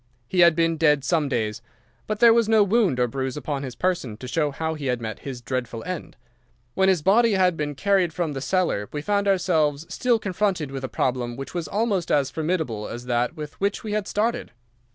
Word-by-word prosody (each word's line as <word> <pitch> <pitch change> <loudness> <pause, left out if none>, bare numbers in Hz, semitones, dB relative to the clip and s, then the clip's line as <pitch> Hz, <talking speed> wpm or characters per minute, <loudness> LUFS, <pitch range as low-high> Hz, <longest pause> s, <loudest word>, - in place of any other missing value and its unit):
He 185 - -1
had 170 -2 +7
been 165 0 +1
dead 150 -3 +3
some 155 -1 +1
days, 110 -5 -2 0.5
but 215 -1 -2
there 235 -1 +7
was 230 -2 +2
no 220 -2 +6
wound 200 - +2
or 125 - +3
bruise 130 +2 -3
upon 145 -2 -3
his 130 -3 -6
person 170 -12 -1
to 130 - -8
show 150 +2 0
how 160 +3 -3
he 150 -3 -5
had 125 -1 0
met 110 -3 -5
his 130 -3 -7
dreadful 120 -2 -3
end. 185 -2 -6 0.6
When 190 0 +3
his 180 -6 +2
body 225 +4 +4
had 185 -2 +3
been 145 -2 -3
carried 185 +3 +2
from 165 -2 -2
the 135 - -5
cellar 170 - 0
we 145 -1 -4
found 200 +1 0
ourselves 160 -6 +1
still 245 -2 +2
confronted 190 -7 -1
with 135 -1 -5
a 130 - -3
problem 125 -2 -1
which 135 +1 -7
was 170 -3 -3
almost 200 -2 -1
as 140 -2 +2
formidable 155 - -2
as 120 +1 -7
that 125 +5 0
with 150 -1 -6
which 200 +1 0
we 215 - -4
had 210 -2 -1
started. 225 +3 -1
160 Hz, 215 wpm, -24 LUFS, 130-190 Hz, 0.6 s, had